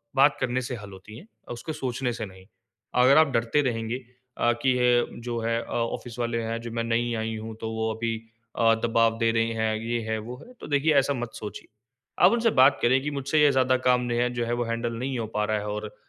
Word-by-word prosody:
बात 140 Hz, +1 st, +5 dB
करने 130 Hz, +1 st, 0 dB
से 125 Hz, 0 st, -4 dB
हल 105 Hz, -3 st, -10 dB
होती 95 Hz, +3 st, -12 dB
हैं, 175 Hz, -, -13 dB, 0.3 s
उसको 135 Hz, +7 st, -6 dB
सोचने 130 Hz, -3 st, -2 dB
से 115 Hz, -1 st, -4 dB
नहीं। 95 Hz, -1 st, -14 dB, 0.6 s
अगर 135 Hz, +3 st, +6 dB
आप 160 Hz, 0 st, +6 dB
डरते 115 Hz, +5 st, +2 dB
रहेंगे 115 Hz, +1 st, -3 dB, 0.4 s
अ, 120 Hz, -, +3 dB
कि 135 Hz, -, +4 dB
ये 120 Hz, -1 st, +4 dB, 0.2 s
जो 120 Hz, -1 st, -2 dB
है 115 Hz, 0 st, 0 dB
अ, -, -, -10 dB
ऑफ़िस 115 Hz, 0 st, -3 dB
वाले 115 Hz, -1 st, -1 dB
हैं, 115 Hz, +1 st, -3 dB
जो 115 Hz, -1 st, -7 dB
मैं 115 Hz, 0 st, -2 dB
नई 120 Hz, +1 st, 0 dB
आयी 110 Hz, 0 st, -3 dB
हूँ 110 Hz, 0 st, -7 dB
तो 110 Hz, 0 st, -3 dB
वो 110 Hz, 0 st, -1 dB
अभी 115 Hz, +1 st, -2 dB, 0.4 s
अ, 115 Hz, -1 st, +4 dB
दबाव 115 Hz, 0 st, +2 dB
दे 115 Hz, -1 st, +3 dB
रहे 115 Hz, 0 st, +1 dB
हैं, 110 Hz, -1 st, 0 dB
ये 115 Hz, +1 st, -2 dB
है, 110 Hz, -, 0 dB
वो 120 Hz, +4 st, -8 dB
है 250 Hz, -, -15 dB
तो -, -, -7 dB
देखिए 150 Hz, +2 st, +2 dB
ऐसा 140 Hz, 0 st, +3 dB
मत 120 Hz, -3 st, -5 dB
सोचिए। 105 Hz, -, -8 dB, 0.6 s
आप 185 Hz, -, +7 dB
उनसे 235 Hz, -1 st, +2 dB
बात 135 Hz, +2 st, +5 dB
करें 130 Hz, +2 st, +3 dB
कि 150 Hz, -, -2 dB
मुझसे 140 Hz, +2 st, 0 dB
ये 145 Hz, -1 st, +6 dB
ज़्यादा 130 Hz, -1 st, +3 dB
काम 125 Hz, 0 st, +4 dB
नहीं 120 Hz, -1 st, -2 dB
है, 125 Hz, 0 st, +2 dB
जो 120 Hz, -1 st, -1 dB
है 120 Hz, -, -1 dB
वो 120 Hz, 0 st, 0 dB
हैंडल 115 Hz, +1 st, -2 dB
नहीं 125 Hz, +2 st, -3 dB
हो 115 Hz, -, -3 dB
पा 105 Hz, -, +1 dB
रहा 110 Hz, 0 st, 0 dB
है 105 Hz, -, -6 dB
और 105 Hz, 0 st, -5 dB
120 Hz, 245 wpm, -26 LUFS, 115-130 Hz, 0.6 s, आप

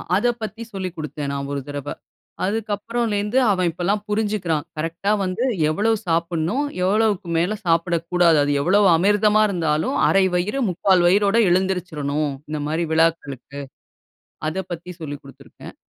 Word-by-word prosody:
அத 210 Hz, +6 st, +2 dB
பத்தி 220 Hz, +2 st, -5 dB
சொல்லி 190 Hz, -1 st, -3 dB
குடுத்தேன் 150 Hz, -2 st, -5 dB
நான் 140 Hz, 0 st, -4 dB
ஒரு 140 Hz, -, -2 dB
தடவ. 145 Hz, 0 st, -5 dB, 0.5 s
அதுக்கு 215 Hz, +2 st, -2 dB
அப்புறம்லேருந்து 220 Hz, +1 st, -2 dB
அவன் 185 Hz, -3 st, +1 dB
இப்பல்லாம் 185 Hz, +5 st, -1 dB
புரிஞ்சுக்குறான். 205 Hz, -7 st, -1 dB
கரெக்ட்‌டா 165 Hz, +6 st, -2 dB
வந்து 185 Hz, +6 st, -2 dB, 0.3 s
எவ்வளவு 215 Hz, +8 st, +1 dB
சாப்பிடனும்? 170 Hz, -, 0 dB, 0.2 s
எவ்வளவுக்கு 205 Hz, -1 st, +1 dB
மேல 180 Hz, +6 st, +1 dB
சாப்பிடக்கூடாது? 170 Hz, 0 st, +2 dB
அது 145 Hz, -, 0 dB
எவ்வளவு 195 Hz, +5 st, +4 dB
"அமிர்தமா 210 Hz, +3 st, +3 dB
இருந்தாலும் 170 Hz, -, 0 dB
1/2 195 Hz, -1 st, +4 dB
வயிறு 205 Hz, +10 st, -1 dB
3/4 185 Hz, 0 st, +2 dB
வயிரோடு 200 Hz, +4 st, +3 dB
எழுந்துருச்சிறனும் 160 Hz, -6 st, -1 dB, 0.2 s
இந்த 155 Hz, -, -3 dB
மாதிரி 165 Hz, +2 st, -1 dB
விழாக்களுக்கு." 160 Hz, -4 st, 0 dB, 0.9 s
அத 155 Hz, -, -4 dB, 0.2 s
பத்தி 175 Hz, +2 st, -7 dB
சொல்லிக் 145 Hz, -3 st, -6 dB
குடுத்துருக்கேன். 140 Hz, -, -13 dB
180 Hz, 130 wpm, -22 LUFS, 160-205 Hz, 0.9 s, எவ்வளவு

